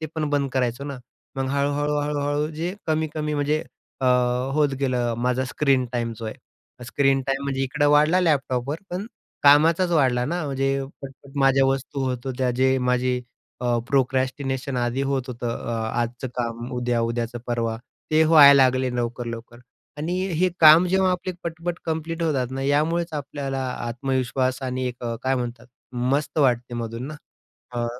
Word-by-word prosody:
ते 155 - -3
पण 155 -2 -1
बंद 140 -2 0
करायचो 125 +1 -1
ना. 140 -3 -6 0.4
मग 135 0 -1
हळू-हळू-हळू-हळू 145 +1 0
जे 170 +5 -3
कमी-कमी 155 -1 -1
म्हणजे 150 +2 0 0.4
अ, 130 - +1 0.5
होत 150 -1 +3
गेलं 125 -3 0
अ, - - -2
माझा 125 +2 0
स्क्रीन 135 -1 +1
टाईम 120 -1 -1
जो 115 - -8
आहे. 110 - -4 0.5
स्क्रीन 135 0 +2
टाईम 135 0 -1
म्हणजे 135 -1 -2
इकडं 145 +2 +1
वाढला 150 +5 +4
लॅपटॉपवर 140 -4 0
पण 185 +4 -4 0.4
कामाचाच 160 +5 +5
वाढला 130 -6 +3
ना 170 +2 -2
म्हणजे 135 0 -1 0.3
पटपट 135 +1 -11
माझ्या 135 0 +4
वस्तू 135 +1 -2
होत 125 -1 -3
होत्या 130 -1 0
जे 130 0 +3
माझे 125 0 +1 0.4
अ, 120 -1 +1
प्रोक्रॅस्टिनेशन 130 0 0
आधी 120 +2 0
होत 135 -2 0
होतं 120 -1 -4
अ, 120 - -5 0.3
आजचं 120 +2 -3
काम 120 +1 -3
उद्या, 120 -1 0
उद्याचं 115 +1 -2
परवा, 115 -2 -1 0.3
ते 155 +1 +5
व्हायला 150 -3 +8
लागले 130 0 +2
लवकर-लवकर 120 -1 -4 0.4
आणि 170 +4 -2 0.2
हे 185 - +4
काम 160 +3 +8
जेव्हा 190 0 +2
आपले 180 +1 -3
पटपट 170 +1 -4
कंप्लीट 165 +1 -3
होतात 135 -6 0
ना 135 +1 -4
यामुळेच 160 +4 +1
आपल्याला 140 -2 -4 0.2
आत्मविश्वास 130 +1 -1
आणि 130 0 -2
एक 125 0 -9
अ, 115 -1 -2
काय 130 0 +1
म्हणतात 120 -1 -4 0.5
मस्त 145 +2 -1
वाटते 125 -3 +2
मधून 115 +2 -4
ना 150 - -7 0.7
अ, 120 - 0
135 Hz, 160 wpm, -24 LUFS, 125-150 Hz, 0.7 s, व्हायला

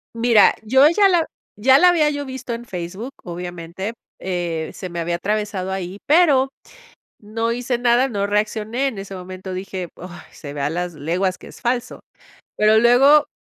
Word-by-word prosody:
Mira, 230 -3 +5
yo 265 +6 +5
ya 395 +4 +4
la 345 -4 +2 0.3
ya 260 +6 +5
la 360 +3 +6
había 310 -4 +3
yo 285 -1 -4
visto 260 -2 -6
en 235 +1 -6
Facebook, 190 +6 -6
obviamente. 175 +3 -6 0.2
Eh, 175 -3 -3
se 185 - -7
me 170 0 -5
había 170 +1 -1
atravesado 205 0 -2
ahí, 190 +1 -5
pero 285 -4 +4 0.7
no 225 +2 -3
hice 245 0 -2
nada, 245 +2 +3
no 200 -4 -1
reaccioné. 215 +5 -1
En 220 -7 -7
ese 195 0 -7
momento 185 0 -8
dije: 185 -1 -5
"Ay, 175 -2 -11
se 145 -2 -9
ve 145 - -6
a 140 - 0
las 175 +1 -3
leguas 175 +6 -1
que - - -14
es - - -14
falso". 245 0 -2 0.6
Pero 215 +1 +5
luego, 270 +5 +5
210 Hz, 175 wpm, -20 LUFS, 180-250 Hz, 0.7 s, la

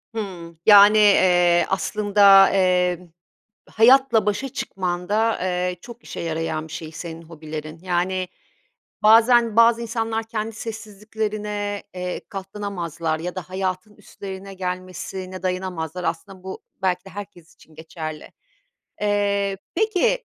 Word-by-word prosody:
Hıı, 180 -6 -6
yani, 205 0 +8
eee, 175 -4 +5
aslında, 200 0 +5
emm, 180 -2 +1 0.6
hayatla 235 -1 +4
başa 210 +7 -1
çıkmanda, 195 +3 -1
eee, 180 0 -1
çok 240 0 -12
işe - - -8
yarayan 160 -1 -3
bir - - -12
şey 160 -1 -7
senin 165 +1 -8
hobilerin. 155 -1 -8
Yani, 185 0 -1 0.8
bazen 230 +1 +5
bazı 230 0 +5
insanlar 225 -1 -2
kendi 225 0 -4
sessizliklerine, 210 -1 -5
eee, 180 0 -4
katlanamazlar 180 -5 -4
ya 180 +3 -5
da 185 -2 -7
hayatın 185 +2 -4
üstlerine 195 -1 -9
gelmesine 185 0 -6
dayanamazlar 180 -2 -3
aslında 180 +3 -5
bu 190 0 -8 0.2
belki 185 -1 0
de - - -10
herkes 190 -4 -10
için 160 - -21
geçerli. 155 -1 -8 0.7
Eee, 200 -1 0 0.2
peki, 440 +5 +1
190 Hz, 115 wpm, -22 LUFS, 180-210 Hz, 0.8 s, yani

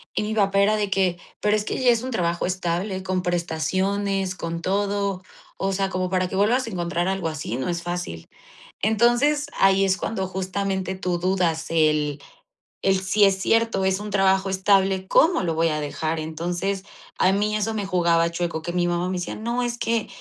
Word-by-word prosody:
Y - - 0
mi 215 +1 -2
papá 200 -2 +2
era 210 +2 +4
de 210 -2 -1
que: 185 -2 +1 0.2
"Pero 210 0 +2
es 210 -1 -1
que - - -3
ya 255 -2 +5
es 230 -1 +1
un 255 - -4
trabajo 175 -8 -1
estable, 185 +1 -2
con 185 -1 -1
prestaciones, 185 +3 -1
con 170 -2 -5
todo. 200 0 0 0.4
O 195 - -1
sea, 195 0 0
como 185 -1 -2
para 185 -1 +1
que 185 - -6
vuelvas 230 +6 +2
a - - -3
encontrar 175 -2 -2
algo 190 -3 -1
así, 155 -7 -4
no 130 - -2
es 170 0 -2
fácil". 175 - -5 0.6
Entonces, 240 +7 +3
ahí 195 0 +4
es 190 -1 +2
cuando 195 -2 -3
justamente 190 0 -2
tú 180 -2 -1
dudas 175 -3 0
el 150 -3 +2 0.6
el, 190 -1 +2
sí 200 +2 +4
es 195 -1 +2
cierto, 225 -3 +2
es 190 0 +1
un 210 0 -6
trabajo 195 -1 +2
estable, 190 0 +2
¿cómo 330 - +4
lo 165 -3 -1
voy 165 +1 +2
a 150 -1 -1
dejar? 155 +3 -2
Entonces, 175 +5 -3 0.3
a 185 - +4
mí 210 +2 +1
eso 215 +1 -1
me 205 -3 -3
jugaba 170 -2 +2
chueco, 170 -1 -2
que 175 +2 -4
mi 175 0 +1
mamá 175 +1 0
me 185 - -2
decía: 180 - -4
"No, 235 +3 -2
es 240 0 -2
que 230 -2 0
190 Hz, 200 wpm, -23 LUFS, 175-200 Hz, 0.6 s, ya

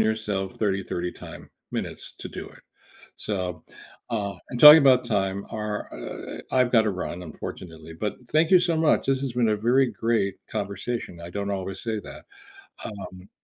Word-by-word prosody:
yourself 105 -3 -1
30/30 95 -4 -2
time - - -11 0.2
minutes - - -5
to - - -7
do - - -7
it. - - -17 0.6
So, 90 -5 -3 0.5
uh 100 -3 -2 0.2
and 125 - -4
talking 150 +1 +12
about 130 -3 +5
time, 95 0 -1
our 105 -1 -2 0.2
uh - - -7
eh - - -8
e - - -8
I've 125 -1 +3
gotta 110 -3 +4
run, 90 -1 -5
unfortunately, 80 0 -8
but 105 +5 -3 0.2
thank 155 +2 +3
you 185 - +8
so 170 -2 +1
much, 160 -3 +2
this 135 -1 +2
has 135 -3 -2
been 120 -2 +2
a 105 - +2
very 125 +5 +3
great 110 -4 0 0.2
conversation, 100 -2 -4
I 85 +1 -8
don't 100 +1 -3
always 95 0 -4
say 110 -2 -2
that, - - -11 0.6
um 95 -2 -8
105 Hz, 175 wpm, -25 LUFS, 95-120 Hz, 0.6 s, talking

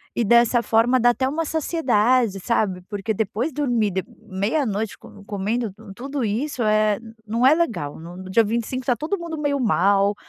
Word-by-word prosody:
e 235 - +1
dessa 235 +2 +4
forma 230 +4 +3
dá 245 +1 +5
até 260 +2 +1
uma 305 +5 -1
saciedade 255 - +1
sabe. 190 -3 0
Porque 205 +1 -2
depois 220 - -2
dormir 245 -7 0
dep 190 +3 -3 0.2
meia 215 +8 -1
noite 215 -1 -3
com 200 - -15
comendo 210 +3 -2 0.2
tudo 270 +1 -4
isso, 240 +5 -2
eh, 215 -1 +2 0.3
não 230 +4 +1
é 275 - +7
legal. 220 - -2
No 170 +2 -10
no 185 0 -9
dia 230 +4 +5
25 235 +4 -3
tá 250 -3 +2
todo 330 +8 -3
mundo 335 -2 -5
meio 285 -2 0
mal, 200 -2 +2
230 Hz, 180 wpm, -22 LUFS, 205-260 Hz, 0.3 s, é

